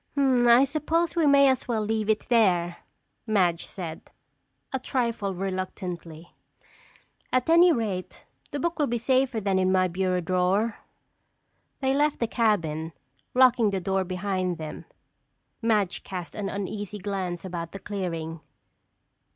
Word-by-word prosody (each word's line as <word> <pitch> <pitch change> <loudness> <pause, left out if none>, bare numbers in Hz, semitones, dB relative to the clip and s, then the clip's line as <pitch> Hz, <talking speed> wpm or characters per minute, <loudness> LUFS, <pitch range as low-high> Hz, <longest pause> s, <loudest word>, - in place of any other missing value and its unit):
"I 250 -2 +5
suppose 320 +4 0
we 330 -3 +3
may 280 -1 +6
as 260 -1 +1
well 225 -3 0
leave 220 0 -1
it 215 -1 +2
there," 180 -8 +2 0.5
Madge 180 -6 +1
said, 170 -4 -7 0.6
a 265 - 0
trifle 235 -7 -1
reluctantly. 180 -3 -5 1.0
"At 255 +5 +1
any 345 +1 +7
rate, 210 - -3 0.3
the 285 - -4
book 340 +2 -2
will 295 - +2
be 240 - -1
safer 255 0 +1
than 195 -2 +1
in 185 0 +2
my 185 -1 +3
bureau 185 +1 0
drawer." 185 +5 0 1.0
They 265 0 +2
left 295 +1 +2
the 235 - 0
cabin, 165 -9 0 0.4
locking 250 -4 +5
the 195 -1 -1
door 190 +1 0
behind 185 -1 -2
them. 155 -1 -7 0.8
Madge 210 -5 +1
cast 180 -3 -6
an 205 -2 -3
uneasy 205 +1 -4
glance 190 -3 -4
about 170 -2 -5
the - - -7
clearing. 170 -5 -4
200 Hz, 135 wpm, -26 LUFS, 180-245 Hz, 1.0 s, any